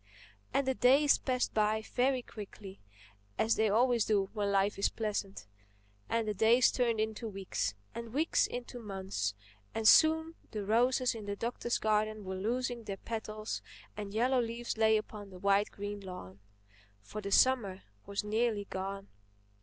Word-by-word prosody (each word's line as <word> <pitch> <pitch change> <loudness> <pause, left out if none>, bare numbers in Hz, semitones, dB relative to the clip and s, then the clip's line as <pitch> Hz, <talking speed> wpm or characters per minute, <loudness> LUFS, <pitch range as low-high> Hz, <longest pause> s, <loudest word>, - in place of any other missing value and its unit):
And 275 -1 +1
the 265 - +3
days 275 +4 +5
passed 250 -2 -1
very 220 +5 +1
quickly—as 105 - -6
they 220 -1 +2
always 235 +2 +3
do 200 -3 +1
when 205 -2 -1
life 200 +1 +1
is 200 - +3
pleasant; 210 -3 -3 0.6
and 230 -1 0
the 210 - 0
days 225 +5 +5
turned 235 -3 +1
into 220 +1 -2
weeks, 195 - -3 0.2
and 235 0 -7
weeks 310 +6 +2
into 245 0 -6
months; 190 - -3 0.4
and 225 -1 +1
soon 320 +3 +6 0.2
the 210 -3 -4
roses 245 +4 +3
in 215 -3 -8
the 200 - -2
Doctor's 235 +2 -2
garden 215 -1 0
were 190 - -4
losing 235 +4 -2
their 195 -2 -4
petals 215 0 -5 0.3
and 205 -1 -6
yellow 250 +4 +2
leaves 235 +1 -3
lay 220 0 +4
upon 210 -1 -7
the 185 - -11
wide 200 +2 +2
green 205 0 -6
lawn. 180 - -9 0.6
For 215 - -7
the 200 0 -5
summer 210 -6 +3 0.2
was 200 +1 -2
nearly 215 0 0
gone. 195 +1 -4
215 Hz, 155 wpm, -32 LUFS, 200-235 Hz, 0.6 s, soon